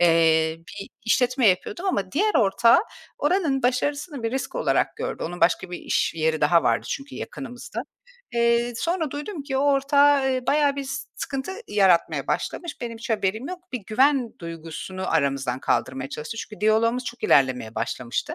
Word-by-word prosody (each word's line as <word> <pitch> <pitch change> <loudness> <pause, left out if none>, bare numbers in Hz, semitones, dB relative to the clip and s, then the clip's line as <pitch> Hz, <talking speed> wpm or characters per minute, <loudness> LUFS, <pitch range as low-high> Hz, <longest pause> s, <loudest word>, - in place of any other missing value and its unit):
eee, 165 -1 +4
bir 165 +4 -10 0.2
işletme 250 +1 +2
yapıyordum 265 - -1
ama 195 - -1
diğer 420 +7 +1
ortağı 230 - +5 0.4
oranın 295 -4 +1
başarısını 285 +2 -1
bir 225 - -1
risk 265 - -3
olarak - - +1
gördü. - - -4
Onun 175 +2 -6
başka 170 +2 +2
bir 175 - -5
iş - - 0
yeri 160 -1 0
daha 165 +3 +4
vardı - - +1
çünkü 275 0 -5
yakınımızda. 245 -2 -6 0.5
Eee, 235 0 +2
sonra 330 +2 -1
duydum 295 +2 -5
ki 270 -2 -3
o - - +2
ortağı, 280 0 +4
eee, 255 -1 -3
bayağı 290 -1 +3
bir 280 - -3
s 275 +1 -5
sıkıntı 275 +6 -4 0.2
yaratmaya 190 -4 +3
başlamış. 340 -7 -3
Benim 230 -2 -5
hiç 245 +1 -7
haberim 220 - -1
yok. 365 - -5
Bir 250 - -3
güven 260 +1 +2
duygusunu 170 +3 -6
aramızdan 135 -3 0
kaldırmaya 130 +1 -1
çalıştı. 150 +10 -6
Çünkü 215 -2 -8
diyaloğumuz 230 +3 +2
çok 240 0 -7
ilerlemeye 130 -5 +3
başlamıştı. 120 -2 -3
235 Hz, 165 wpm, -24 LUFS, 175-280 Hz, 0.5 s, ortağı